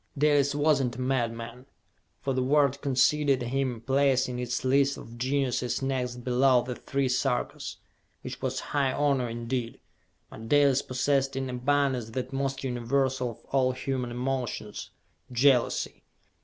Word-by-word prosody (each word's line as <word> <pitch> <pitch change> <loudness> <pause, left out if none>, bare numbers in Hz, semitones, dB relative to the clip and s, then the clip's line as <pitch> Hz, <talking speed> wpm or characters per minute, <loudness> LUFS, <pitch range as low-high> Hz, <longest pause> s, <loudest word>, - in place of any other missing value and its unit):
Dalis 145 -1 +3
was 145 -1 +3
not 125 -3 -2
a - - -8
madman, 120 -1 -2 0.6
for 135 - 0
the 130 - 0
world 140 +1 +2
conceded 140 0 +2
him 125 -1 -2
place 135 +1 +2
in 125 -1 -4
its 125 +1 -3
list 140 +1 +3
of 115 - -10
geniuses 130 0 -1
next 125 -2 -2
below 125 0 +3
the 125 - -4
three 135 +2 -2
Sarkas, 125 -1 -1 0.5
which - - -7
was - - -2
high 140 -2 +2
honor 140 -4 +1
indeed; 115 +1 -4 0.5
but 115 0 -9
Dalis 140 -2 +4
possessed 135 +1 0
in 135 -1 -2
abundance 130 -2 0
that 130 +3 -4
most 135 0 -2
universal 130 +1 0
of 115 - -12
all 130 -2 +3
human 130 -1 -3
emotions 125 -4 -3 0.4
jealousy. 125 0 +2
130 Hz, 140 wpm, -28 LUFS, 125-140 Hz, 0.6 s, Dalis